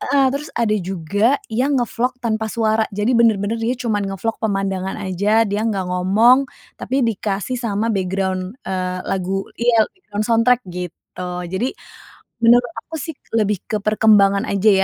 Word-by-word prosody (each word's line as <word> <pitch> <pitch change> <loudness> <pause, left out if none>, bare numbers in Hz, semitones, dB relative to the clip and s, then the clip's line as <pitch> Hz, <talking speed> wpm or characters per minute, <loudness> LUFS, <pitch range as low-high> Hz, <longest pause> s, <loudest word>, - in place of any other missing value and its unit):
heeh, 275 0 +2
terus 285 +2 -4
ada 230 -2 +1
juga 195 - +1 0.2
yang 265 +5 +1
nge-vlog 245 +1 -1
tanpa 220 -1 0
suara, 220 -1 +1
jadi 210 +4 0
benar-benar 225 -1 +2
dia 240 +3 0
cuman 225 -4 -1
nge-vlog 195 +4 -2
pemandangan 195 -3 -1
aja, 205 +3 +1
dia 205 0 -2
nggak 195 -3 -1
ngomong, 225 +9 +4 0.3
tapi 260 0 0
dikasih 215 +2 -2
sama 220 0 -1
background, 190 +1 -2
eee, 185 -1 -2
lagu 195 +1 -2 0.2
iya 235 -2 +4
background 215 - -5
soundtrack 235 +2 +3
gitu. 180 0 -7 0.2
Jadi, 230 +8 0 0.7
menurut 235 0 +4 0.2
aku 325 - -5
sih 320 +2 -5 0.2
lebih 210 -3 +1
ke 215 - 0
perkembangan 210 -2 +4
aja 200 +2 +3
215 Hz, 145 wpm, -20 LUFS, 195-235 Hz, 0.7 s, ngomong